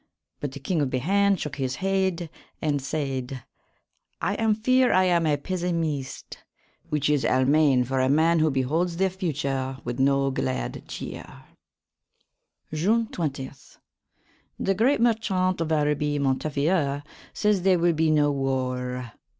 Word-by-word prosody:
But 145 Hz, -2 st, -4 dB
the 140 Hz, -, -7 dB
King 160 Hz, +3 st, -1 dB
of 140 Hz, -, 0 dB
Behayne 195 Hz, +10 st, +2 dB
shook 150 Hz, -6 st, -5 dB
his 130 Hz, -2 st, -2 dB
heade 190 Hz, -3 st, -1 dB, 0.3 s
and 145 Hz, -2 st, 0 dB
sayd: 135 Hz, -3 st, -3 dB, 0.8 s
"I -, -, 0 dB
am 220 Hz, -1 st, +1 dB
feare 255 Hz, +3 st, +3 dB
I 185 Hz, -, +4 dB
am 170 Hz, -3 st, +2 dB
a 145 Hz, -1 st, +2 dB
pesymyste," 165 Hz, -4 st, -3 dB, 0.5 s
which 150 Hz, -1 st, 0 dB
is 150 Hz, -2 st, +2 dB
Almayne 135 Hz, 0 st, +3 dB
for 130 Hz, +2 st, -1 dB
a 130 Hz, 0 st, +2 dB
man 160 Hz, +3 st, +3 dB
who 155 Hz, 0 st, +3 dB
beholds 155 Hz, +6 st, 0 dB
the 190 Hz, 0 st, +1 dB
future 140 Hz, -7 st, -2 dB
with 120 Hz, +1 st, -4 dB
no 135 Hz, 0 st, +3 dB
gladde 65 Hz, -, -3 dB
chere. -, -, -8 dB, 1.3 s
June 220 Hz, +9 st, +1 dB
20. 140 Hz, -5 st, -3 dB, 1.1 s
The 195 Hz, -, +1 dB
great 235 Hz, +7 st, +2 dB
merchaunt 190 Hz, -6 st, +1 dB
of 160 Hz, -1 st, -2 dB
Araby, 150 Hz, -1 st, +1 dB
Montefior, 145 Hz, +2 st, 0 dB, 0.3 s
says 210 Hz, -3 st, +1 dB
there 185 Hz, 0 st, +4 dB
will 170 Hz, 0 st, +2 dB
be 160 Hz, 0 st, +1 dB
no 150 Hz, -1 st, +3 dB
warre. 125 Hz, -3 st, -2 dB
150 Hz, 140 wpm, -25 LUFS, 135-185 Hz, 1.3 s, I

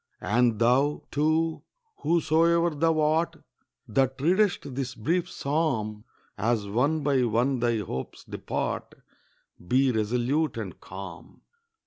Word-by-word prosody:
And 115 Hz, +3 st, +2 dB
thou, 125 Hz, +6 st, +2 dB
too, 155 Hz, +2 st, +1 dB, 0.4 s
whosoe'er 170 Hz, +1 st, +2 dB
thou 160 Hz, +1 st, +1 dB
art, 155 Hz, +2 st, +1 dB, 0.5 s
That 130 Hz, +4 st, +1 dB
readest 175 Hz, -2 st, +1 dB
this 130 Hz, -1 st, -4 dB
brief 170 Hz, +10 st, 0 dB
psalm, 125 Hz, -, -1 dB, 0.3 s
As 110 Hz, 0 st, 0 dB
one 140 Hz, +9 st, +1 dB
by 135 Hz, -3 st, +2 dB
one 120 Hz, +4 st, +1 dB
thy 120 Hz, -1 st, +1 dB
hopes 90 Hz, -11 st, -5 dB
depart, -, -, -4 dB, 0.7 s
Be 130 Hz, +3 st, +3 dB
resolute 125 Hz, +8 st, 0 dB
and -, -, -6 dB
calm. -, -, -10 dB
135 Hz, 110 wpm, -27 LUFS, 120-160 Hz, 0.7 s, Be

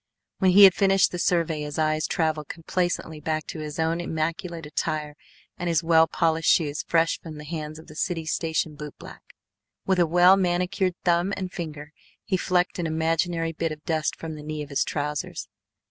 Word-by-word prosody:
When 190 Hz, -, +4 dB
he 200 Hz, +3 st, +8 dB
had 190 Hz, -2 st, +10 dB
finished 195 Hz, -1 st, +3 dB
the 180 Hz, -, -4 dB
survey 165 Hz, -3 st, +1 dB
his 150 Hz, -1 st, -5 dB
eyes 155 Hz, 0 st, +1 dB
travelled 155 Hz, -3 st, -1 dB
complacently 170 Hz, -2 st, -2 dB
back 155 Hz, +1 st, -2 dB
to 160 Hz, -, -7 dB
his 150 Hz, +1 st, -6 dB
own 165 Hz, +1 st, 0 dB
immaculate 165 Hz, 0 st, -3 dB
attire, 150 Hz, 0 st, -3 dB, 0.5 s
and 175 Hz, -, -2 dB
his 165 Hz, -1 st, +1 dB
well 165 Hz, -1 st, +5 dB
polished 165 Hz, -1 st, +2 dB
shoes 150 Hz, -3 st, +1 dB
fresh 165 Hz, 0 st, +2 dB
from 155 Hz, -2 st, -9 dB
the 150 Hz, -, -8 dB
hands 155 Hz, -1 st, -5 dB
of 160 Hz, -, -12 dB
the -, -, -13 dB
city 165 Hz, -1 st, -2 dB
station 160 Hz, -1 st, -1 dB
bootblack. 150 Hz, -1 st, -10 dB, 0.7 s
With 190 Hz, -1 st, +2 dB
a 175 Hz, -, +4 dB
well 180 Hz, +3 st, +6 dB
manicured 180 Hz, 0 st, 0 dB
thumb 175 Hz, +2 st, +2 dB
and 185 Hz, -1 st, -4 dB
finger 150 Hz, -4 st, -6 dB, 0.3 s
he 200 Hz, -, 0 dB
flecked 180 Hz, 0 st, 0 dB
an 170 Hz, -, -1 dB
imaginary 165 Hz, +1 st, 0 dB
bit 165 Hz, 0 st, -2 dB
of 155 Hz, 0 st, -8 dB
dust 155 Hz, -2 st, 0 dB
from 165 Hz, -1 st, -7 dB
the 150 Hz, -, -8 dB
knee 150 Hz, 0 st, -5 dB
of 145 Hz, -, -11 dB
his 140 Hz, -, +2 dB
trousers. 150 Hz, 0 st, -3 dB
165 Hz, 190 wpm, -25 LUFS, 155-175 Hz, 0.7 s, had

